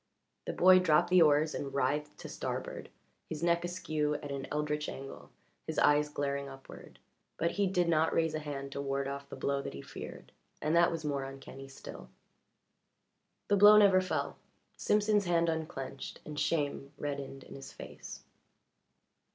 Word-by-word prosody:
The - - -2
boy 185 +1 +7
dropped 160 -2 +3
the 185 -1 +7
oars 155 0 +4
and 140 -1 -5
writhed 145 +3 0
to - - -7
starboard, - - -5 0.4
his 160 0 -5
neck 170 0 +2
askew 155 -4 -1
at 145 -1 -6
an 140 -1 -4
eldritch 150 0 -1
angle, 135 0 -9 0.4
his - - -4
eyes 150 0 +4
glaring 140 -1 -2
upward. 135 0 -12 0.4
But 170 +1 +1
he 200 -1 +1
did 180 -2 +1
not 160 -1 +3
raise 160 -1 +1
a 155 - -1
hand 140 -2 -6
to 140 - -4
ward 140 0 -1
off 140 0 -6
the - - -7
blow 140 0 -1
that - - -6
he 70 - -7
feared, - - -9 0.3
and 155 +2 0
that 170 +1 +5
was 165 -2 -4
more 140 -2 -1
uncanny 135 0 -9
still. 135 - -10 1.4
The 205 - +3
blow 205 +2 +9
never 195 -3 +6
fell. 185 - -2 0.4
Simpson's 210 -1 +2
hand 170 -1 +2
unclinched 155 -5 -5
and 150 -1 -5
shame 145 -3 -1
reddened 140 -2 -5
in - - -12
his 135 0 -9
face. - - -10
150 Hz, 170 wpm, -32 LUFS, 140-170 Hz, 1.4 s, blow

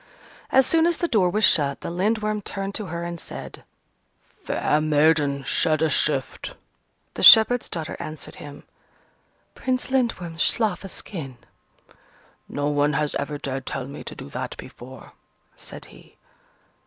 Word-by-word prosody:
As 265 0 +4
soon 325 +3 +3
as 345 - +1
the 345 - -1
door 210 - +2
was 215 +4 -1
shut, 145 -6 +3
the - - -5
Lindworm 210 +3 0
turned 195 0 -5
to 210 -2 -4
her 170 0 -5
and 170 0 -5
said, - - -9 0.8
"Fair 150 - 0
maiden, 150 -2 +2
shed 155 +3 +1
a 160 - +2
shift!" - - 0 0.6
The - - -6
shepherd's 230 +2 +8
daughter 160 -2 -4
answered 155 0 -8
him, 145 -1 -11 0.9
"Prince 255 0 -2
Lindworm, 190 -11 -1
slough 210 +1 +1
a 195 - -7
skin!" 140 - -6 1.1
"No 145 0 -2
one 145 0 +1
has 150 +1 -1
ever 145 +1 -3
dared 135 -2 -5
tell 130 - -4
me 140 - -9
to - - -6
do - - -9
that - - -5
before!" 130 0 -12 0.4
said - - -9
he. - - -18
165 Hz, 150 wpm, -23 LUFS, 145-215 Hz, 1.1 s, shepherd's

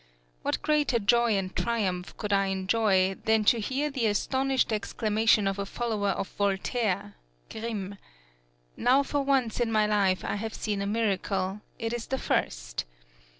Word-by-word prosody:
What - - -2
greater 300 -5 +2
joy 235 0 +3
and 185 -1 -3
triumph 195 -6 -1
could 210 -2 -2
I 195 0 +3
enjoy 190 0 +2
than 220 -1 +3
to 235 - +5
hear 270 +7 -1
the 250 -5 0
astonished 260 +4 +1
exclamation 215 0 +2
of 195 0 -1
a 200 - -1
follower 215 -3 -1
of 195 - -1
Voltaire 200 - -1 0.4
(Grimm): 205 -3 -5 0.8
_Now 265 +3 +3
for 290 0 0
once 270 -5 +1
in 235 -2 +1
my 215 -1 +3
life 200 -3 +1
I - - -1
have 220 +1 -5
seen 205 -2 -2
a 200 - -2
miracle; 200 -2 -1 0.2
it 225 0 -3
is 240 -1 -4
the 265 - -1
first. - - -2
215 Hz, 155 wpm, -28 LUFS, 195-235 Hz, 0.8 s, to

